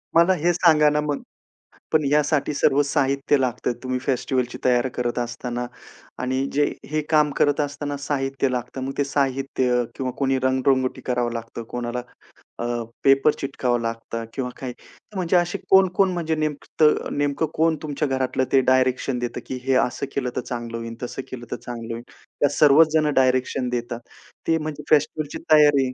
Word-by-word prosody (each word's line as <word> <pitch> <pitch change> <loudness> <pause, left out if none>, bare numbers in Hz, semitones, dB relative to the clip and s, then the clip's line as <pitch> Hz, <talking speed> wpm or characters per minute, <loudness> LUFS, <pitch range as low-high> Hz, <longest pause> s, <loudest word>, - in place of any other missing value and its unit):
मला 170 +3 +6
हे 175 0 +1
सांगा 155 -3 +5
ना, 150 0 +1
मग, 150 -1 -3 0.7
पण 155 -1 +3
ह्यासाठी 150 +1 +2
सर्व 145 0 +3
साहित्य 140 0 +1
लागतंय 125 -1 -1
तुम्ही 130 0 -1
फेस्टिव्हलची 125 -1 -1
तयारी 125 0 +3
करत 120 0 -1
असताना 120 0 -3 0.6
आणि 130 +1 0
जे 145 +1 +3 0.3
हे 155 0 +1
काम 150 -2 +4
करत 145 0 +3
असताना 145 0 -3
साहित्य 135 -1 -1
लागतं 125 +1 -4
मग 135 - -3
ते 145 - +3
साहित्य 135 -3 0
किंवा 130 -1 -2
कोणी 135 -1 +1
रंगरंगोटी 130 0 +1
करावं 125 -2 0
लागतं. 115 0 -6
कोणाला 120 +1 -4 0.6
अ, - - -3 0.4
पेपर 135 +2 +5
चिटकवावं 125 -3 -1
लागतं 115 0 -4
किंवा 130 -2 -3
काही 130 -2 -4
तर 210 - -18
म्हणजे 180 -1 +1
असे 175 +3 +1
कोण-कोण 190 0 +5
म्हणजे 165 -2 -1
नेमतं 155 0 +1
नेमकं 145 +2 +1
कोण 160 0 +2
तुमच्या 150 -1 -2
घरातलं 130 0 0
ते 135 - +6
डायरेक्शन 130 0 +1
देतं, 120 0 -3
की 130 - -4
हे 135 0 +2
असं 130 +3 -4
केलं 125 -3 -1
तर - - +1
चांगलं 120 -1 -5
होईल, 115 0 -6
तसं 125 +2 -4
केलं 120 -2 -7
तर - - 0
चांगलं 115 -1 -5
होईल. 115 +1 -8 0.4
त्या 145 - +5
सर्वच 150 +2 +6
जण 155 -2 +3
डायरेक्शन 130 0 +2
देतात. 120 -1 -3 0.5
ते 165 0 +3
म्हणजे 155 -1 -5
फेस्टिव्हलची 150 0 +1
तयार 150 -2 +6
135 Hz, 165 wpm, -23 LUFS, 125-150 Hz, 0.7 s, मला